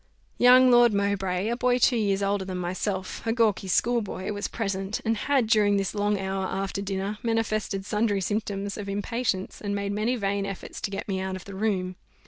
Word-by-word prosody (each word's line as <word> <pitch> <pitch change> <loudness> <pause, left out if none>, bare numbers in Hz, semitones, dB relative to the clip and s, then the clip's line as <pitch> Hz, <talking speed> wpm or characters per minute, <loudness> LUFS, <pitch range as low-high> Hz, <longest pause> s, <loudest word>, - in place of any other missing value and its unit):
Young 250 +1 +7
Lord 240 -3 +6
Mowbray, 195 -1 0
a 235 - 0
boy 250 0 +2
two 250 0 +4
years 200 -3 +1
older 200 0 0
than 185 -1 -5
myself, 185 +2 -3
a - - +3
gawkee 220 -4 +1
schoolboy, 210 -1 0
was 205 0 -3
present; 195 -2 -3
and 225 0 +2
had, 265 +3 +1
during 210 -2 +3
this 195 -1 -1
long 205 0 +1
hour 190 0 -2
after 195 +1 -3
dinner, 200 +1 -3
manifested 215 -4 -1
sundry 210 -1 +1
symptoms 200 0 -2
of 200 -1 -5
impatience, 205 -1 -2
and 200 -1 -2
made 200 0 -2
many 215 +5 0
vain 200 -3 -1
efforts 195 -1 -6
to - - -2
get 195 0 -5
me 190 -2 -1
out 190 0 -3
of 185 - -9
the 200 - -9
room. 190 -3 -1
200 Hz, 195 wpm, -26 LUFS, 195-220 Hz, -, Young